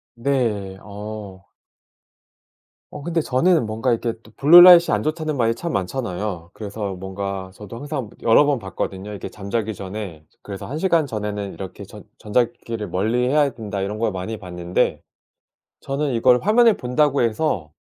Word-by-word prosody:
네. 115 Hz, -7 st, -1 dB
어. 105 Hz, -2 st, -8 dB, 1.5 s
어 145 Hz, -, -8 dB
근데 170 Hz, +1 st, 0 dB
저는 150 Hz, 0 st, +2 dB
뭔가 115 Hz, +4 st, -1 dB
이렇게 115 Hz, 0 st, 0 dB
또 110 Hz, -, -17 dB
블루 165 Hz, +5 st, +9 dB
라이트가 175 Hz, -6 st, +8 dB
안 105 Hz, -, -2 dB
좋다는 155 Hz, -1 st, -2 dB
말이 115 Hz, -2 st, +2 dB
참 170 Hz, +8 st, -5 dB
많잖아요. 95 Hz, -4 st, -3 dB
그래서 100 Hz, -2 st, -5 dB
뭔가 95 Hz, 0 st, -5 dB
저도 105 Hz, +2 st, -10 dB
항상 135 Hz, -4 st, -5 dB
여러 115 Hz, +5 st, +6 dB
번 145 Hz, -1 st, +2 dB
봤거든요, 95 Hz, 0 st, -5 dB
이게 100 Hz, -, -6 dB
잠자기 105 Hz, +2 st, -3 dB
전에. 95 Hz, -5 st, -7 dB, 0.2 s
그래서 100 Hz, -2 st, -7 dB
1 150 Hz, +4 st, -5 dB
시간 170 Hz, -4 st, +2 dB
전에는 105 Hz, -4 st, -4 dB
이렇게 95 Hz, -2 st, -8 dB
'전 -, -, -12 dB
전자 110 Hz, +3 st, +1 dB
기기를 115 Hz, -3 st, -7 dB
멀리해야 125 Hz, -, +1 dB
된다.' 105 Hz, -5 st, -5 dB
이런 105 Hz, +2 st, -3 dB
걸 115 Hz, -1 st, +1 dB
많이 95 Hz, +4 st, -5 dB
봤는데 90 Hz, -3 st, -2 dB, 0.8 s
저는 140 Hz, 0 st, -2 dB
이걸 125 Hz, +1 st, +4 dB
화면을 225 Hz, +1 st, +4 dB
본다고 140 Hz, +3 st, +1 dB
해서 110 Hz, -, -1 dB
110 Hz, 320 characters per minute, -22 LUFS, 100-135 Hz, 1.5 s, 블루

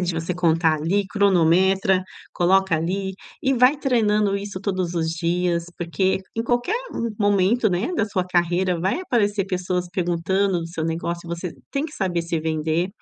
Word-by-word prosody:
de 180 Hz, -2 st, -1 dB
você 165 Hz, +2 st, -2 dB
contar 165 Hz, -2 st, +2 dB
ali, 185 Hz, +7 st, 0 dB
cronometra, 190 Hz, -1 st, +3 dB, 0.3 s
coloca 190 Hz, -1 st, +3 dB
ali 190 Hz, +4 st, -2 dB, 0.3 s
e 270 Hz, -, +2 dB
vai 250 Hz, +4 st, +5 dB
treinando 215 Hz, -7 st, +2 dB
isso 200 Hz, -1 st, -6 dB
todos 185 Hz, -3 st, -2 dB
os 165 Hz, -1 st, 0 dB
dias, 170 Hz, +1 st, 0 dB
porque 180 Hz, +3 st, 0 dB, 0.2 s
em 230 Hz, -, -1 dB
qualquer 245 Hz, -, 0 dB, 0.4 s
momento, 205 Hz, +3 st, +3 dB
né, 190 Hz, -, -1 dB
da 220 Hz, -, +1 dB
sua 190 Hz, -3 st, -2 dB
carreira 180 Hz, 0 st, +1 dB
vai 190 Hz, -, 0 dB
aparecer 205 Hz, -, +1 dB
pessoas 180 Hz, -1 st, -2 dB
perguntando 180 Hz, +1 st, 0 dB
do 165 Hz, -, -6 dB
seu 165 Hz, -2 st, -4 dB
negócio 170 Hz, +1 st, -3 dB
e -, -, -9 dB
você 170 Hz, 0 st, -5 dB, 0.2 s
tem 280 Hz, +2 st, -1 dB
que 310 Hz, -, -7 dB
saber 180 Hz, -, -1 dB
se 165 Hz, 0 st, -2 dB
vender. 160 Hz, +2 st, -1 dB
185 Hz, 165 wpm, -23 LUFS, 170-200 Hz, 0.4 s, vai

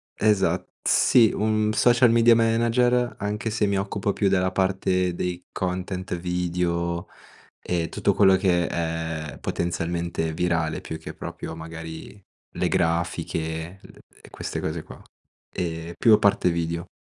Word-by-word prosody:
esa 105 Hz, -2 st, +2 dB, 0.2 s
sì, 115 Hz, -4 st, +5 dB
un 110 Hz, 0 st, +1 dB
social 120 Hz, +2 st, +5 dB
media 115 Hz, 0 st, +6 dB
manager, 120 Hz, +2 st, +2 dB
anche 105 Hz, +2 st, -2 dB
se 110 Hz, -1 st, 0 dB
mi 100 Hz, -1 st, +1 dB
occupo 100 Hz, 0 st, -1 dB
più 100 Hz, -, +1 dB
della 95 Hz, -1 st, +2 dB
parte 95 Hz, -1 st, +1 dB
dei 90 Hz, 0 st, -3 dB
content 95 Hz, 0 st, -3 dB
video 85 Hz, 0 st, -2 dB, 0.5 s
e 85 Hz, -3 st, -2 dB
tutto -, -, 0 dB
quello 95 Hz, -2 st, +5 dB
che 90 Hz, -3 st, +2 dB
è 80 Hz, -2 st, -3 dB
potenzialmente 85 Hz, -1 st, -2 dB
virale, 85 Hz, -1 st, -1 dB
più 80 Hz, -, -6 dB
che 80 Hz, -, -8 dB
proprio 80 Hz, -, -7 dB
magari 80 Hz, +4 st, -9 dB, 0.4 s
le -, -, +1 dB
grafiche, 85 Hz, +1 st, -2 dB
le -, -, -16 dB, 0.2 s
e -, -, -15 dB
queste -, -, -5 dB
cose 80 Hz, +1 st, -3 dB
qua, -, -, -13 dB, 0.5 s
ehm, 85 Hz, -2 st, -4 dB
più 115 Hz, -, +5 dB
a -, -, +5 dB
parte 100 Hz, -3 st, +3 dB
video. 85 Hz, 0 st, -2 dB
90 Hz, 140 wpm, -24 LUFS, 85-105 Hz, 0.5 s, media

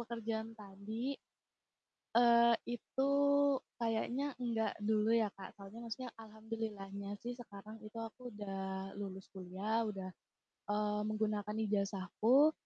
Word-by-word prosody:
pekerjaan 225 Hz, -1 st, -3 dB
tadi, 215 Hz, +6 st, -4 dB, 1.0 s
eee, 235 Hz, 0 st, +7 dB, 0.2 s
itu 265 Hz, +4 st, 0 dB, 0.7 s
kayaknya 240 Hz, +5 st, 0 dB
enggak 230 Hz, -2 st, +1 dB
dulu 215 Hz, +1 st, +3 dB
ya, 220 Hz, -3 st, +4 dB
Kak. 190 Hz, -1 st, -9 dB
Soalnya 200 Hz, +3 st, -10 dB
maksudnya 240 Hz, +2 st, -4 dB
alhamdulillahnya 215 Hz, -2 st, -5 dB
sih 245 Hz, +1 st, -3 dB
sekarang 215 Hz, -2 st, -9 dB
itu 215 Hz, -, -10 dB
aku 235 Hz, +2 st, -7 dB
udah 195 Hz, -1 st, -4 dB
lulus 190 Hz, -1 st, -6 dB
kuliah, 195 Hz, +5 st, -1 dB
udah, 195 Hz, -3 st, -4 dB, 0.6 s
eee, 210 Hz, 0 st, +1 dB
menggunakan 210 Hz, -1 st, 0 dB
ijazahku 210 Hz, -, +4 dB
215 Hz, 110 wpm, -37 LUFS, 200-230 Hz, 1.0 s, eee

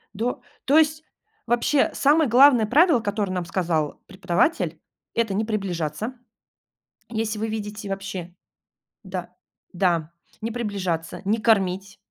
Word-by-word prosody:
До 235 Hz, +4 st, -2 dB, 0.2 s
То 285 Hz, +3 st, +4 dB
есть, 310 Hz, 0 st, +1 dB, 0.4 s
вообще, 240 Hz, +4 st, +2 dB
самое 295 Hz, -1 st, +3 dB
главное 250 Hz, -2 st, +7 dB
правило, 290 Hz, -, +4 dB
которое 205 Hz, -3 st, -2 dB
нам 180 Hz, -1 st, -1 dB
сказал 165 Hz, -5 st, -1 dB
преподаватель,- 190 Hz, -, 0 dB, 0.3 s
это 225 Hz, -4 st, 0 dB
не 215 Hz, +3 st, 0 dB
приближаться. 200 Hz, -, -3 dB, 0.9 s
Если 220 Hz, -1 st, -2 dB
вы 220 Hz, +1 st, -2 dB
видите 210 Hz, -2 st, -5 dB
вообще 190 Hz, -3 st, -5 dB, 0.7 s
да, 180 Hz, -2 st, -6 dB, 0.4 s
да, 170 Hz, -3 st, 0 dB, 0.3 s
не 225 Hz, -, -2 dB
приближаться, 195 Hz, -9 st, -3 dB
не 215 Hz, +3 st, +1 dB
кормить. 195 Hz, -3 st, +1 dB
210 Hz, 120 wpm, -24 LUFS, 185-235 Hz, 0.9 s, главное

